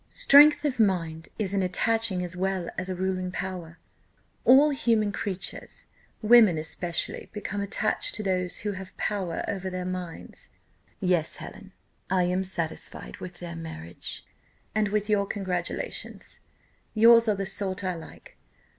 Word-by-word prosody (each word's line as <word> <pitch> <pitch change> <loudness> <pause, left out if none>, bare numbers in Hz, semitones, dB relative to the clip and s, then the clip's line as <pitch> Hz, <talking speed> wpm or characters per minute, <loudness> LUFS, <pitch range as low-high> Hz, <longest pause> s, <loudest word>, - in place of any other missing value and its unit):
Strength 295 +1 +7
of 260 -4 -1
mind 165 -6 +1
is 200 -3 -1
an 200 - +2
attaching 195 +1 +1
as 180 0 -5
well 190 -1 -1
as 185 0 -3
a 185 - -2
ruling 185 0 -2
power: 180 -3 -5 0.7
all 280 +4 +7
human 225 -6 +1
creatures, 195 -2 -4 0.3
women 220 -6 +7
especially, 165 +2 -2
become 205 0 -3
attached 215 +1 -1
to 215 - -3
those 180 -2 0
who 205 - +1
have 190 -1 -9
power 190 -5 -2
over 190 -1 -3
their 185 0 -4
minds. 180 -2 -6 0.5
Yes, 180 -5 +1
Helen, 195 -2 -10 0.4
I 185 -1 +3
am 180 +2 +1
satisfied 170 -4 -4
with 180 -1 -8
their 170 -1 -7
marriage, 85 - -7 0.5
and 215 -1 +2
with 210 0 0
your 205 -2 +2
congratulations: 185 -4 -4 0.6
yours 230 +1 +7
are 210 - +3
the 195 0 -3
sort 190 0 -1
I 185 -1 0
like. 165 -2 -12
190 Hz, 145 wpm, -27 LUFS, 180-210 Hz, 0.7 s, Strength